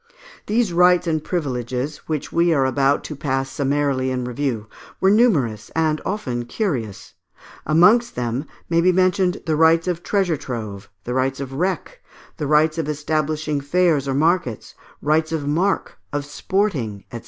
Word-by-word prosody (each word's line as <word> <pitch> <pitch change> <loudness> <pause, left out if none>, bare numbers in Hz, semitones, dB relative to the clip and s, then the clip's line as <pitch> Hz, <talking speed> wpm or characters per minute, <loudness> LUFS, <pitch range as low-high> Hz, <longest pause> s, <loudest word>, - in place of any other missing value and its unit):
These 215 -3 +1
rights 180 +1 +4
and 155 -2 -1
privileges, 130 -3 -3
which 155 -3 -3
we 170 +1 +3
are 135 -2 +2
about 135 +1 +2
to 150 - -6
pass 135 -1 -2
summarily 140 -2 0
in 130 -1 -2
review, 125 -3 -2 0.3
were 190 - +4
numerous, 150 - +2
and 155 -1 +1
often 125 - -3
curious: 120 - -3 0.5
amongst 210 +10 +4
them 120 +4 -2 0.2
may 170 0 +2
be 185 +2 +4
mentioned 185 0 +1
the 160 -2 +1
rights 165 +2 +4
of 175 -2 -1
treasure 185 -5 0
trove, 110 -7 -6
the 125 - -4
rights 130 +1 0
of 135 -1 -6
wreck, 190 - -2 0.4
the 150 -4 -3
rights 155 +2 +3
of 155 -2 -2
establishing 150 0 -1
fairs 155 -1 +2
or 135 - -1
markets, 155 - 0 0.3
rights 155 +1 +2
of 155 -3 -2
marque, 175 +7 0 0.2
of 145 -1 -2
sporting, 145 - -2
&c. 120 - -5
150 Hz, 155 wpm, -21 LUFS, 135-175 Hz, 0.5 s, rights